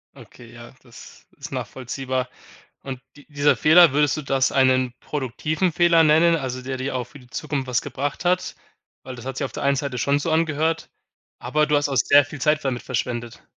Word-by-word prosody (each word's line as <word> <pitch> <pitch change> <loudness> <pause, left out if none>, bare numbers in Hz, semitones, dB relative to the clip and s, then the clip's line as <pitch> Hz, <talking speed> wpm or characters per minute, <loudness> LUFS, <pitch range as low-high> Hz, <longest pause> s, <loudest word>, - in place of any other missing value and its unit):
Okay, 120 -2 -15
ja, 120 +1 -13
das 120 -3 -15
ist - - -9
nachvollziehbar 130 0 -4 0.5
und 130 -2 -7
di 145 - -17
dieser 145 0 +2
Fehler, 165 0 +6
würdest 150 0 +2
du - - -3
das 135 -1 +1
einen 130 -2 +2
produktiven 150 +6 -2
Fehler 170 0 +4
nennen, 160 +2 +4
also 130 -4 -4
der 130 +1 -5
dir 130 +1 -4
auch 125 - -1
für 140 - -15
die 125 - -18
Zukunft 145 -4 -4
was 125 -2 0
gebracht 145 +5 -4
hat? 180 +1 0 0.5
Weil 130 -1 -8
das 120 - -11
hat 135 -1 -5
sich 140 - -1
auf - - -7
der - - -6
einen 140 0 +2
Seite 135 -2 -3
schon 140 +5 +1
so 160 +2 -2
angehört, 160 0 0 0.5
aber 150 +5 0
du 150 - +2
hast 145 0 +1
auch 135 - -2
sehr 145 +6 +5
viel 145 0 -10
Zeit 150 +2 +2
damit 125 -3 -2
verschwendet. 120 -2 -4
140 Hz, 205 wpm, -22 LUFS, 130-150 Hz, 0.5 s, Fehler